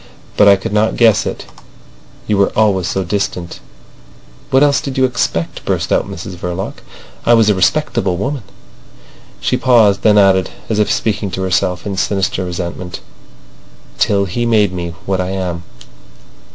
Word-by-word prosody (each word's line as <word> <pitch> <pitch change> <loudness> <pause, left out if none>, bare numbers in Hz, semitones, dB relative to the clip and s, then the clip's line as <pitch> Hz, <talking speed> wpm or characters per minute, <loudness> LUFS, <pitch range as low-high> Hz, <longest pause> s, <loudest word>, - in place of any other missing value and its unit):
But 105 - +5
I 100 - +8
could 95 +1 -5
not 110 +1 +2
guess 115 -3 +3
it. - - -5 0.8
You 105 - 0
were 100 - +3
always 100 -4 +2
so 95 +2 -1
distant... 90 -2 -3 0.4
." - - -26
"What 135 +2 +4
else 145 -1 +3
did 135 -1 -5
you 130 - +4
expect?" 115 -9 -2
burst - - -1
out - - +1
Mrs 90 +2 -7
Verloc. 90 +2 -5 0.4
"I 120 - +5
was 110 -2 +4
a - - +3
respectable 95 -1 +1
woman—" 135 +7 -3 1.0
She - - 0
paused, 110 -6 +4
then 105 -1 +4
added, 95 -2 +4 0.2
as 110 -2 0
if 105 - +2
speaking 105 -2 -1
to 95 +1 -4
herself, 90 -1 0
in 100 -2 -4
sinister 95 -1 0
resentment: 90 0 -5 1.0
"Till 100 -1 +2
he 100 +6 -3
made 105 -5 +2
me 85 -1 -5
what 95 -1 0
I 90 - -3
am." 90 -3 -3
95 Hz, 165 wpm, -16 LUFS, 90-110 Hz, 1.0 s, I